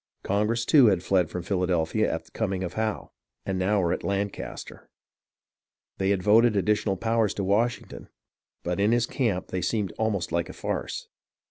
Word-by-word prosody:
Congress, 105 +4 0
too, 135 -3 +6
had 95 -4 +2
fied 90 -4 +2
from 90 - -5
Philadelphia 90 -4 0
at - - -4
the - - -22
coming 95 -1 -2
of 90 -1 -4
Howe, 110 -1 -3 0.3
and 95 -1 -2
now 100 +3 +2
were 85 -2 +1
at - - -4
Lancaster. 100 0 -4 1.1
They 95 0 +1
had 100 -2 +1
voted 110 +2 +5
additional 100 0 +1
powers 115 0 +1
to 100 - -2
Washington, 110 +5 -1 0.5
but 90 +2 -2
in 105 +3 +3
his 120 -1 +2
camp 105 -8 -1
they 95 - -2
seemed 95 -1 -1
almost 105 -6 -1
like 85 0 -1
a - - -7
farce. - - -4
100 Hz, 170 wpm, -26 LUFS, 90-110 Hz, 1.1 s, too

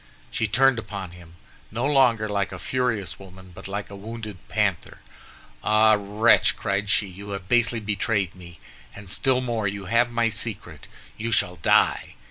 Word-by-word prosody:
She 115 - -1
turned 130 +3 +3
upon 100 -5 -7
him, 85 -1 -15 0.3
no 115 +4 -2
longer 125 -6 +3
like 100 -1 -1
a - - -6
furious 125 -7 -2
woman, 95 -1 -13
but 95 +3 -10
like 100 +1 -5
a - - -7
wounded 105 -1 -8
panther. - - -1 0.7
"Ah, 110 0 +5
wretch!" 105 +3 +3
cried 100 0 -2
she, 105 - +2
"you 100 +2 -10
have 100 -2 -6
basely 120 +1 +2
betrayed 105 -2 -1
me, 85 -3 -13 0.4
and 100 -2 -8
still 130 +1 +1
more, 115 -4 -1
you 100 0 -4
have 115 +5 +2
my 115 -1 +1
secret! 110 -1 -4 0.3
You 115 +2 -2
shall 90 -5 +1
die." 80 - +2
105 Hz, 165 wpm, -24 LUFS, 100-115 Hz, 0.7 s, Ah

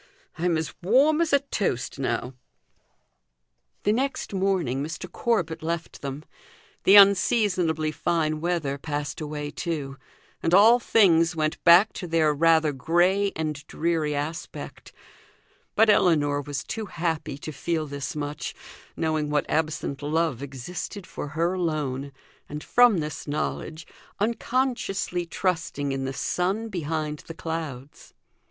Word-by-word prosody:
I'm 170 -1 +1
as 160 -1 -3
warm 275 - +4
as 335 - +1
a 280 -1 +4
toast 195 - -2
now." 125 0 -2 1.5
The 210 - +3
next 270 -2 -2
morning 185 -9 0
Mr. 155 +3 -5
Corbet 175 -9 -1
left 165 +1 -4
them. 140 +2 -6 0.6
The 195 - +7
unseasonably 185 -6 +4
fine 155 -1 -1
weather 160 -5 -1
passed 145 0 -4
away 150 -1 -4
too, 145 -5 -4 0.4
and 165 +2 +3
all 225 +5 +7
things 175 -8 +4
went 155 -1 -2
back 180 +5 +7
to 180 - -6
their 160 -2 +2
rather 160 0 +4
grey 175 +8 +2
and 155 -2 -3
dreary 160 -3 -1
aspect; 155 +4 -6 0.8
but 225 - +5
Ellinor 150 -8 +3
was 145 0 -4
too 220 -2 -5
happy 165 -5 -3
to 155 - -7
feel 160 +2 -2
this 140 -2 -5
much, 145 0 -4 0.4
knowing 155 -2 0
what 150 -1 0
absent 155 -3 -1
love 155 -3 0
existed 150 - -6
for - - -6
her 165 +4 0
alone, 150 -6 -2 0.4
and 150 +1 -6
from 240 -8 +4
this 150 0 -6
knowledge 155 +2 -3 0.3
unconsciously 230 -5 -1
trusting 165 -6 -1
in 135 0 -2
the 135 - -2
sun 190 - -1
behind 155 -4 -3
the 165 - -7
clouds. 155 -5 -6
160 Hz, 130 wpm, -25 LUFS, 150-185 Hz, 1.5 s, The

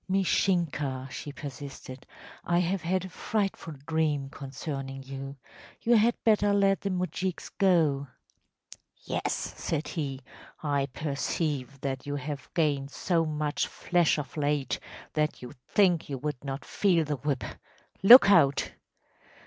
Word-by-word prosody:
‚ÄĚ 190 +1 +3
‚ÄúMishinka,‚ÄĚ 145 -9 0
she 145 - -6
persisted, 140 -2 -9 0.4
“I 175 - +1
have 180 +2 +1
had 185 +2 0
a - - -7
frightful 195 -4 -2
dream 150 -4 0
concerning 135 -1 -6
you. 135 +1 -7 0.5
You 235 +1 +4
had 225 +2 +4
better 205 -2 +4
let 195 -1 +3
the 200 - -2
moujiks 185 0 -3
go.‚ÄĚ 160 -8 +3 1.1
‚ÄúYes,‚ÄĚ - - -1
said 155 -1 -3
he; 140 -5 -3 0.4
“I 140 -2 +1
perceive 140 -1 -2
that 135 0 -3
you 145 - -2
have 145 -1 -5
gained 145 -5 +1
so 165 +2 0
much 150 -1 -1
flesh 175 -3 +1
of 140 -5 -5
late 145 -4 0 0.3
that 150 -3 -1
you 125 - -8
think 180 -7 +3
you 140 - -3
would 140 -1 -4
not 135 0 -5
feel 175 -6 +2
the 145 -1 -2
whip. 135 0 -2 0.6
Lookout! 195 - +8
150 Hz, 135 wpm, -28 LUFS, 140-180 Hz, 1.1 s, Lookout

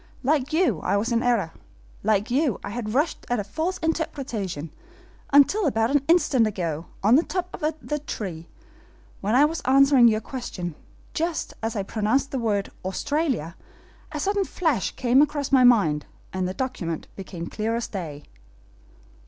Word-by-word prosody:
Like 280 +1 +1
you, 340 +3 +2
I - - 0
was 225 +4 -1
in 235 0 +2
error; 235 -9 +1 0.5
like 210 +1 +1
you, 270 - +1
I - - -5
had 225 0 -4
rushed 300 +4 0
at 245 -2 +1
a - - -1
false 320 - -2
interpretation, 235 - -3 0.6
until 295 +8 +5
about 225 -2 +1
an 290 -1 +3
instant 280 -9 +4
ago, 170 -6 -3 0.2
on 225 +6 +6
the - - +5
top 365 0 -3
of 305 0 0
the 300 0 -2
tree, 180 - -6 0.7
when 210 +4 0
I 280 +3 +7
was 320 +2 -2
answering 270 -1 +6
your 215 -1 +3
questions, 215 - -5 0.4
just 330 0 -2
as 225 +1 -2
I 200 - -1
pronounced 225 +7 0
the 265 - -1
word 205 -4 -1
'Australia,' 220 - -1 0.6
a 300 - -4
sudden 400 +5 +1
flash 305 - 0
came 255 +1 +4
across 290 -2 0
my 265 -2 +6
mind, 170 -12 +4 0.3
and 185 -1 -1
the 185 - -4
document 180 -11 -3
became 180 -3 -7
clear 220 +5 -2
as 235 - -2
day." 155 -7 -6
240 Hz, 165 wpm, -25 LUFS, 200-290 Hz, 0.7 s, I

